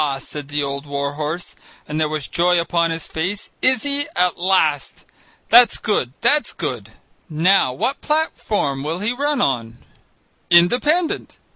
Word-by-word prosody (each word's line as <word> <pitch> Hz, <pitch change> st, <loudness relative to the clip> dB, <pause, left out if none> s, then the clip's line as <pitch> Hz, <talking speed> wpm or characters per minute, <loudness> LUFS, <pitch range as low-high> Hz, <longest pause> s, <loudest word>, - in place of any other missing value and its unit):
said 145 Hz, +1 st, -8 dB
the 145 Hz, 0 st, -2 dB
old 140 Hz, +1 st, -5 dB
war 140 Hz, 0 st, -3 dB
horse, 155 Hz, +4 st, -5 dB, 0.3 s
and 150 Hz, +1 st, -3 dB
there 155 Hz, -, +1 dB
was 155 Hz, -2 st, -4 dB
joy 175 Hz, 0 st, +2 dB
upon 170 Hz, 0 st, 0 dB
his 165 Hz, -1 st, -4 dB
face, 185 Hz, +6 st, -4 dB
"is 255 Hz, -2 st, +3 dB
he? 285 Hz, 0 st, 0 dB
At 180 Hz, -1 st, +2 dB
last! 175 Hz, -6 st, 0 dB, 0.4 s
That's 240 Hz, +1 st, +6 dB
good, 130 Hz, -, -1 dB
that's 295 Hz, 0 st, +2 dB
good -, -, -5 dB, 0.4 s
now 165 Hz, -2 st, +3 dB
what 255 Hz, -, -2 dB
platform 220 Hz, -, -1 dB
will 155 Hz, +4 st, -3 dB
he 210 Hz, +5 st, -1 dB
run 285 Hz, +1 st, -1 dB
on?" 120 Hz, -, -1 dB, 0.7 s
"Independent." 250 Hz, -, +2 dB
170 Hz, 145 wpm, -20 LUFS, 145-235 Hz, 0.7 s, That's